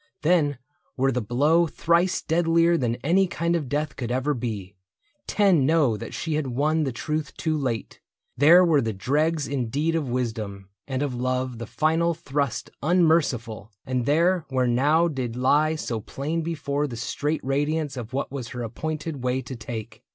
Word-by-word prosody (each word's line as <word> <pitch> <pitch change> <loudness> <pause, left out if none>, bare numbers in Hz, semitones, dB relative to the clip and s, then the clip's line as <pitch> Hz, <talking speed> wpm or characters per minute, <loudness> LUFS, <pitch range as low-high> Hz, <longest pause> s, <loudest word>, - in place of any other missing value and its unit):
Then 150 -4 +3 0.4
were 135 +1 +2
the 125 -1 -1
blow 145 +10 +3
Thrice 170 +3 +1
deadlier 165 +1 +3
than 120 -7 0
any 185 +6 +3
kind 170 0 -1
of 150 -6 -2
death 145 +1 -2
Could 120 -3 -4
ever 130 +4 0
be: 105 -6 -5 0.5
10 195 -8 +3
know 145 -5 +3
that - - -7
she 160 - -3
had 150 -2 -1
won 150 +5 +1
The 135 - -1
truth 150 +4 -4
too 160 -1 0
late 125 -8 -3 0.2
— - - -52
there 175 +4 +8
were 155 -5 +4
the 115 -2 -2
dregs 150 +9 0
in 130 -5 -2
deed 150 +7 0
Of 155 -5 -1
wisdom, 110 -6 -3 0.2
and 135 0 -1
of 140 -3 -2
love 130 0 -2
the 115 - -6
final 165 +4 +1
thrust 140 -6 -2
Unmerciful; 145 - +1
and 125 -2 -1
there 170 +4 +3
where 130 -1 +1
now 145 +8 +3
did 130 -7 -3
lie 150 +5 +3
So 120 -7 -3
plain 150 +9 -3
before 145 -3 -2
her 150 - +1
the 120 -4 -7
straight 145 +6 -2
radiance 145 +2 -1
Of 120 -2 -6
what 135 0 -3
was 135 -4 -5
her 120 0 -5
appointed 150 +4 -4
way 130 +1 0
to 130 +1 -7
take. 115 -2 -7
140 Hz, 180 wpm, -25 LUFS, 125-160 Hz, 0.5 s, there